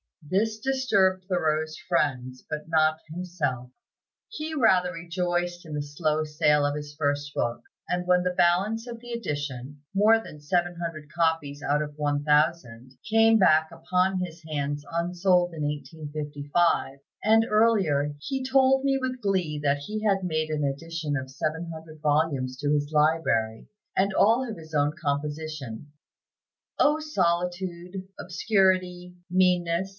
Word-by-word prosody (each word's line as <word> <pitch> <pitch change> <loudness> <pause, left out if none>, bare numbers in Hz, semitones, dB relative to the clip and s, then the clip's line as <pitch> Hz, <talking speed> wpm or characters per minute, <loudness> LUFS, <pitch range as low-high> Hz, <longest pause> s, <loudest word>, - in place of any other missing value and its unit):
This 215 +6 0
disturbed 205 -8 +1
Thoreau's 155 -4 0
friends, 130 -3 0
but 150 0 -5
not 155 -1 +2
himself; 155 -8 -3 0.6
he 315 -7 -5
rather 185 -9 +3
rejoiced 175 0 -2
in 155 - -8
the 150 - -2
slow 155 +1 -1
sale 150 -1 +2
of 145 0 0
his 150 0 -7
first 145 -1 -1
book; 120 0 -1 0.3
and 180 0 -1
when 180 0 +4
the 180 0 0
balance 195 +7 +2
of 235 -1 -7
the 240 +1 -10
edition, 145 - -5
more 220 +3 +4
than 150 - -11
seven 175 +4 0
hundred 155 -3 -6
copies 160 -4 0
out 145 +1 +1
of 150 -1 -5
one 145 -1 0
thousand, 145 -5 +1 0.2
came 225 0 +5
back 160 -5 +4
upon 180 +3 0
his 170 -2 -6
hands 145 -1 -2
unsold 175 +1 +1
in 155 -2 -4
1855, 145 0 -1 0.2
and 225 +1 +5
earlier, 195 -10 +2
he 265 - -3
told 265 0 +3
me 270 -1 +3
with 255 -1 -3
glee 185 -7 0
that 145 0 +1
he 215 +9 -5
had 195 -3 +2
made 155 -3 -1
an 155 -1 -1
addition 155 +2 -3
of 130 -1 -5
seven 155 +5 -3
hundred 160 -1 -11
volumes 145 -4 +1
to 145 +2 -1
his 145 0 0
library, 150 -8 +1 0.3
and 195 +1 +2
all 230 +7 +3
of 220 - -6
his 160 -1 -13
own 145 0 +2
composition. 145 -3 -4 0.9
"O 300 +2 +4
solitude, 180 - -2
obscurity, 180 -1 +1
meanness!" 180 0 +2
165 Hz, 145 wpm, -26 LUFS, 145-185 Hz, 0.9 s, came